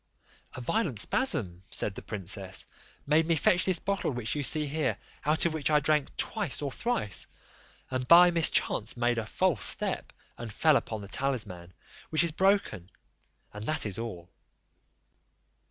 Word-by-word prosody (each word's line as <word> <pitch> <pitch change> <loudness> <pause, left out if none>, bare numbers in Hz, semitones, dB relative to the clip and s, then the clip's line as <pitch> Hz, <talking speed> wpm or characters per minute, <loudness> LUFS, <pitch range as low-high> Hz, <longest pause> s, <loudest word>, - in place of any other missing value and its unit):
"A 125 - -6
violent 155 - -1
spasm," 100 - +1
said 105 - -2
the - - -9
princess, 95 -1 -4 0.4
"made 155 +3 +2
me 165 - +2
fetch 175 +4 +4
this 185 -2 +2
bottle 195 +3 -2
which 120 -5 -2
you 150 - -2
see 150 +2 +5
here, 150 +2 -1 0.3
out 155 +3 +2
of 170 - +1
which 155 -3 -1
I 150 -1 +4
drank 150 0 0
twice 205 - -2
or 140 -2 -3
thrice, 130 - -2 0.6
and 130 -1 -3
by 175 +4 +8
mischance 150 -9 +1
made 120 -1 +1
a 110 - -5
false 160 - 0
step, - - -1 0.3
and 115 -2 -6
fell 155 +7 +3
upon 110 -5 -2
the 100 - -9
talisman, 105 -9 -3 0.4
which 155 0 +2
is 170 - +1
broken, 190 - 0 0.6
and 105 +1 -7
that 155 - 0
is 105 0 -3
all." 90 -7 -7
140 Hz, 160 wpm, -29 LUFS, 105-165 Hz, 0.6 s, by